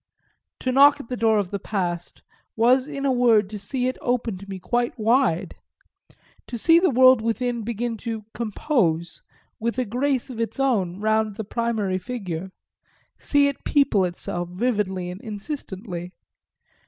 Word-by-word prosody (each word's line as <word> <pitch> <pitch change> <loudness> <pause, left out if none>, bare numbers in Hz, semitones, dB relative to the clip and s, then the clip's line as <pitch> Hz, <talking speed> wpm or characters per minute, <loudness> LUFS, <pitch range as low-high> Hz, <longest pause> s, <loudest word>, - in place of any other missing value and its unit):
To 255 - 0
knock 285 +3 +6
at 255 - -10
the 250 - -2
door 225 -2 +3
of 200 -3 -1
the 200 - -2
past 175 -4 -4 0.3
was 255 +4 +3
in 280 -2 -4
a 270 - +3
word 230 -5 +3
to 210 - -5
see 250 +6 -1
it 255 - -3
open 245 -4 -1
to 200 +1 -12
me 195 - -5
quite 240 +7 -1
wide 225 -5 +2 0.9
to 240 - -5
see 330 +8 +5
the 365 - +3
world 255 -2 +6
within 235 +1 -1
begin 230 +1 -3
to 225 -2 -5
"compose" 200 - -1 0.4
with 235 +2 -2
a 255 - 0
grace 255 +3 -1
of 230 -2 -4
its 230 +4 -3
own 200 -10 +1
round 215 0 +1
the 220 - -4
primary 215 -4 -1
figure, 185 -5 -5 0.7
see 285 -1 +3
it 280 - -4
people 275 -9 +3
itself 175 -1 -3
vividly 190 -3 -1
and 185 +3 -9
insistently. 200 - -6
225 Hz, 160 wpm, -24 LUFS, 195-255 Hz, 0.9 s, knock